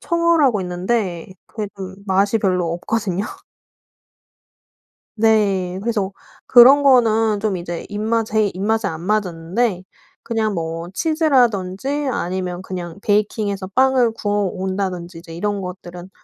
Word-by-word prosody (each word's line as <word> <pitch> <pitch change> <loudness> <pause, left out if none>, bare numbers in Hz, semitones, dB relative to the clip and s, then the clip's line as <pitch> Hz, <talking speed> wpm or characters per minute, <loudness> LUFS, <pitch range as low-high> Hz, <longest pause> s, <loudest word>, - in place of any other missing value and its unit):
청어라고 335 - +2
있는데 180 0 -2 0.2
그게 210 -3 -5
좀 190 -1 -7
맛이 195 +3 +2
별로 180 -5 0
없거든요. 195 +1 -2 1.9
네. 200 -4 +2
그래서 205 -4 -1 0.3
그런 260 +4 +8
거는 225 -6 +4
좀 205 -3 -1
이제 175 -1 -5
입맛 220 +2 -1
제 215 -1 +1
입맛에 210 +3 -1
안 160 -3 -6
맞았는데 185 +1 -1 0.4
그냥 220 -3 -1
뭐 165 0 -4
치즈라든지 270 - +1
아니면 180 -1 -3
그냥 180 -1 -6
베이킹 210 0 +1
해서 195 -1 -4
빵을 255 +1 +3
구워 205 -2 -1
온다든지 185 -2 -4
이제 165 -1 -11
이런 205 +3 -2
것들은 180 0 -8
200 Hz, 270 characters per minute, -20 LUFS, 180-225 Hz, 1.9 s, 그런